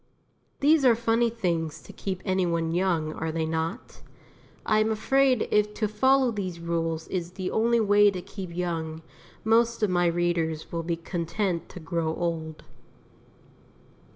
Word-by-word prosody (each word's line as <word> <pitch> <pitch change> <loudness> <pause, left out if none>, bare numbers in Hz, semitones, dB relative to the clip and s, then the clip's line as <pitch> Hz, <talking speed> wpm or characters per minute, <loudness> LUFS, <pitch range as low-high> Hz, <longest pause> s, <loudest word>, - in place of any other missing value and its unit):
These 295 +1 +5
are 245 -3 +6
funny 230 +1 +2
things 170 -9 -2
to - - -12
keep 190 -2 -5
any 190 -1 +1
one 165 -1 -1
young, 170 -4 0
are 160 0 -3
they 160 0 -1
not? 160 +1 -4 0.6
I 215 -1 +3
am 215 +1 +2
afraid 255 +3 +2
if 210 0 +2
to 215 - 0
follow 260 +4 +3
these 185 -5 -4
rules 165 -1 -2
is 175 -1 -3
the 185 -1 -4
only 235 +1 +2
way 205 -1 +5
to 190 -2 -4
keep 190 -3 -7
young, 160 -2 -3 0.4
most 230 +1 +2
of 205 - +2
my 175 -1 +3
readers 170 -2 -1
will 170 - -2
be 170 +1 -2
content 170 +1 -3
to - - -9
grow 160 -1 -2
old. 160 -2 -3
180 Hz, 155 wpm, -26 LUFS, 165-215 Hz, 0.6 s, are